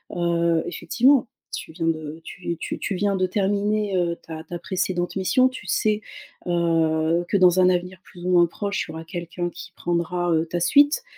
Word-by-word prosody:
Heu, 170 -1 +1
effectivement, 255 0 +2 0.3
tu - - -7
viens 165 0 -4
de 155 -1 -2
tu 170 -2 -5
tu - - -5
tu 195 - -2
viens 200 +1 +1
de 185 -1 +1
terminer, 205 +1 0
heu, 170 -1 +1
ta 160 -1 -8
ta 175 +1 -5
précédente 180 0 -2
mission. 195 +7 +3
Tu 240 -7 -10
sais, 215 +3 +1 0.5
heu, 165 -1 +2
que 200 - +3
dans 185 0 +5
un 185 - +6
avenir 180 0 -1
plus 175 -1 -12
ou 180 - +1
moins 175 -1 +5
proche, 200 +3 -3
il - - -8
y 160 - -9
aura 160 0 -7
quelqu'un 175 +1 -4
qui - - -10
prendra, 175 0 -1
heu, 160 +1 +1
ta 175 +1 -2
suite. 290 - +4
175 Hz, 195 wpm, -23 LUFS, 170-195 Hz, 0.5 s, un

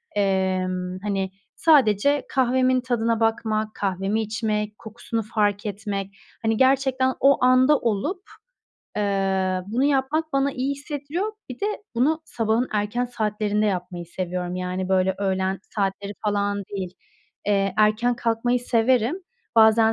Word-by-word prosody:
Emm, 185 -2 0
hani, 195 -2 -1 0.2
sadece 280 -2 +4
kahvemin 255 0 +2
tadına 230 -2 0
bakmak, 220 -1 0
kahvemi 195 +2 -1
içmek, 215 -1 -2
kokusunu 230 +1 -5
fark 205 -1 0
etmek, 200 -1 -3 0.3
hani, 225 -1 +1
gerçekten 260 0 +3
o 275 -1 +4
anda 255 +3 +5
olup, 235 - -1 0.8
eee, 195 -2 0
bunu 235 +6 0
yapmak 290 +3 +1
bana 275 0 +1
iyi 260 +2 -2
hissettiriyor. 295 +8 -4 0.2
Bir 255 - -8
de 405 - 0 0.3
bunu 305 +7 +1
sabahın 230 -1 0
erken 210 +4 0
saatlerinde 210 -3 -1
yapmayı 180 -3 -3
seviyorum. 180 0 -4
Yani, 185 0 -3
böyle, 190 0 +2
öğlen 190 -1 0 0.2
saatleri 200 0 -2
falan 205 -1 0
değil. 185 -3 -5 0.5
Eee, 195 -2 +1
erken 215 +3 +3
kalkmayı 235 +2 0
severim. 245 - +1 0.3
Bazen 220 0 +6
215 Hz, 125 wpm, -24 LUFS, 195-255 Hz, 0.8 s, Bazen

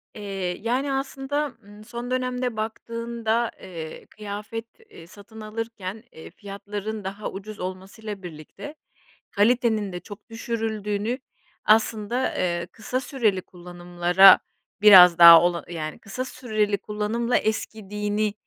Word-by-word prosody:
Eee, 195 -4 -4
yani, 260 +5 -1
aslında, 270 +1 -3
ımm, 205 +1 -14
son 240 +2 -7
dönemde 250 -2 -2
baktığında, 230 +1 -2
eee, 165 -3 -8
kıyafet, 210 +2 -7 0.2
eee, 165 - -14
satın 210 +3 -13
alırken, 215 -2 -6
eee, 160 - -12
fiyatların 205 +2 -7
daha 200 +2 -5
ucuz 205 +2 -9
olmasıyla 190 +2 -7
birlikte, 175 - -10 0.6
kalitenin 220 -1 +2
de 180 - -4
çok 205 +5 -13
düşürüldüğünü 225 0 -3 0.5
aslında, 220 +3 +2
eee, 175 -1 -1
kısa 250 +3 -3
süreli 235 -8 0
kullanımlara 175 +1 +4 0.4
biraz 180 -5 +9
daha, 170 -1 +11
ola 175 -2 0
yani, 155 -3 -5
kısa 250 +6 -5
süreli 215 -6 -1
kullanımla 215 +4 -1
eskidiğini 210 -1 -2
210 Hz, 115 wpm, -24 LUFS, 190-230 Hz, 0.6 s, daha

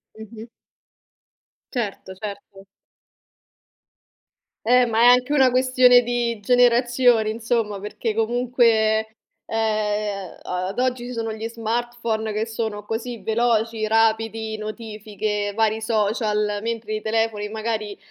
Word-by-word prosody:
Mh-mh. 220 +1 -10 1.3
Certo, 205 -5 -4
certo. 200 0 -9 2.0
Eh 250 +2 +5
ma 225 -1 +1
è - - +6
anche 250 +3 +5
una 265 -3 +5
questione 255 -1 +5
di 240 -2 -1
generazioni 245 0 +3
insomma, 225 -2 -1
perché 210 +2 -4
comunque, 225 -1 +2 0.4
ehm, 210 -3 -2
a 180 0 -3
ad 195 - -5
oggi 250 -1 0
ci 250 - -6
sono 225 -1 -3
gli 220 +1 -5
smartphone 230 -1 -3
che 215 +1 -1
sono 220 -2 -4
così 225 +2 -4
veloci, 225 0 0
rapidi, 220 0 +1
notifiche, 215 -1 -4
vari 220 0 +1
social, 210 -1 0
mentre 225 -1 -3
i 215 - -4
telefoni 220 -1 -1
magari, 215 -1 -3
225 Hz, 115 wpm, -22 LUFS, 215-240 Hz, 2.0 s, è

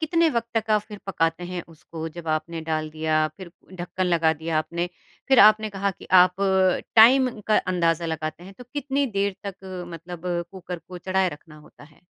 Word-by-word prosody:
कितने 330 +1 +2
वक़्त 235 -2 -2
तक 220 0 0
आप 215 -1 +4
फ़िर 210 -1 -11
पकाते 165 -2 0
हैं 180 -2 -4
उसको 160 0 -8
जब 170 -2 -7
आपने 155 +1 -2
डाल 155 -1 -1
दिया, 155 0 +1
फ़िर 185 -3 -10 0.3
ढक्कन 180 +1 -3
लगा 165 -2 +3
दिया 160 +1 -2
आपने 170 +2 -2 0.4
फ़िर 265 -2 +5
आपने 215 +1 +6
कहा 200 0 -1
कि - - -13 0.2
आप 180 0 +1 0.6
टाइम 245 +1 +6
का 215 - +3
अंदाज़ा 170 -2 0
लगाते 155 +1 -4
हैं 195 +1 -12
तो 250 - -10
कितनी 280 -1 -1
देर 200 0 0
तक 185 -2 -7
मतलब 170 +1 -9 0.3
कुकर 180 -2 -7
को 180 +2 -11
चढ़ाया 190 +1 +1
रखना 155 -1 -11
होता 150 -1 -17
है? 150 +3 -23
180 Hz, 185 wpm, -24 LUFS, 165-210 Hz, 0.6 s, आपने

